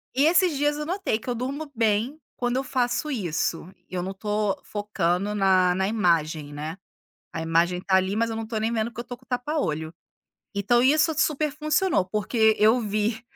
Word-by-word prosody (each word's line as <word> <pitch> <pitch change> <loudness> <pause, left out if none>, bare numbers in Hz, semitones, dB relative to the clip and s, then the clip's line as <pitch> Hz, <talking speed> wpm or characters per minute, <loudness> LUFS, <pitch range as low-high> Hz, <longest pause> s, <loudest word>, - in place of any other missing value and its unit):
E 275 +3 +4
esses 340 0 +4
dias 290 +1 +1
eu 300 - -3
notei 360 - -1
que 240 - -8
eu 245 - 0
durmo 280 +5 -4
bem 225 +6 +1 0.2
quando 245 0 -1
eu 265 - 0
faço 255 +3 -1
isso, 175 - -2 0.2
e - - -16
eu 180 - -1
não 190 +1 -4
tô 210 0 -1
focando 205 -1 -1
na 185 -2 +3
na 190 +1 0
imagem, 160 -8 0
né. 155 +4 -5 0.6
A 160 - -3
imagem 170 +2 +1
tá 190 0 +2
ali, 190 +1 +1
mas 230 +1 +1
eu 225 - -3
não 225 0 -4
tô 225 0 -5
nem 220 +2 -1
vendo, 225 0 -1
porque 235 - -8
eu - - -5
tô 245 - -7
com 255 +1 -26
tapa 255 +5 -2
olho. 160 - -2 0.6
Então 205 +4 +3
isso 300 +5 +4
super 305 0 +1
funcionou, 305 - +1
porque 220 +3 +2
eu 220 +4 +5
vi 215 +1 -1
220 Hz, 200 wpm, -25 LUFS, 190-260 Hz, 0.6 s, eu